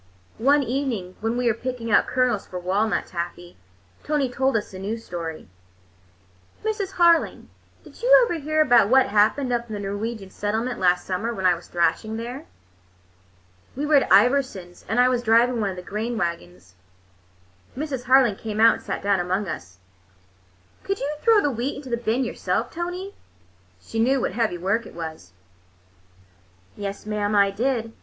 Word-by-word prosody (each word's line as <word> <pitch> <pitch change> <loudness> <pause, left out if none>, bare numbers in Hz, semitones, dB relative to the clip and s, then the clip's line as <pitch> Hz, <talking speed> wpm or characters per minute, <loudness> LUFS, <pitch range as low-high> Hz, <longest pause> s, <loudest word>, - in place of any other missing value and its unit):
One 280 +4 +4
evening 240 -8 -3
when 225 +2 -2
we 250 - -1
were 235 - +3
picking 240 -1 -5
out - - +4
kernels 250 -5 0
for 180 - -7
walnut 195 +4 0
taffy, 175 0 -6 0.5
Tony 295 -4 0
told 265 -1 +1
us 210 - -5
a 185 - -7
new 205 +4 -3
story. 170 -7 -7 1.2
"Mrs. 420 -3 -2
Harling, 340 -1 +3 0.3
did - - -16
you - - +1
ever 345 -8 -3
hear 310 +1 +1
about 240 -8 +5
what 265 +1 +4
happened 220 +6 +2
up 235 0 -1
in 215 - -4
the - - -5
Norwegian 205 0 -5
settlement 225 +4 -2
last 180 -1 +2
summer, 195 +5 -2
when 190 -2 -4
I 180 - +6
was 170 0 -9
thrashing 215 +5 0
there? 245 +6 -7 1.3
We 285 +3 -2
were 305 - 0
at 280 - +4
Iversons', 200 -4 +2
and 225 +3 +1
I 250 - +6
was 250 -1 +1
driving 235 +1 +3
one 205 - 0
of 190 - -5
the 180 - -8
grain 220 +5 -3
wagons." 95 - -5 1.0
Mrs. 270 -4 -4
Harling 255 -5 +4
came 215 -1 -5
out 230 0 +7
and - - -8
sat - - -4
down 200 -1 +2
among 185 +3 -1
us. 95 - -7 1.1
"Could 395 0 -2
you 285 +2 -2
throw 450 -3 +5
the 290 - +1
wheat 250 +4 -3
into 275 -3 -9
the - - +2
bin 235 +2 -1
yourself, - - -2
Tony?" 355 +3 -5 0.7
She 225 - -6
knew 260 +4 +3
what - - -1
heavy 215 -3 -1
work 195 +6 -1
it - - -14
was. 160 - -8 1.4
"Yes, 200 0 -6
mam, 210 -1 -1
I 200 -1 +4
did. 230 +1 -1
225 Hz, 175 wpm, -23 LUFS, 195-265 Hz, 1.4 s, out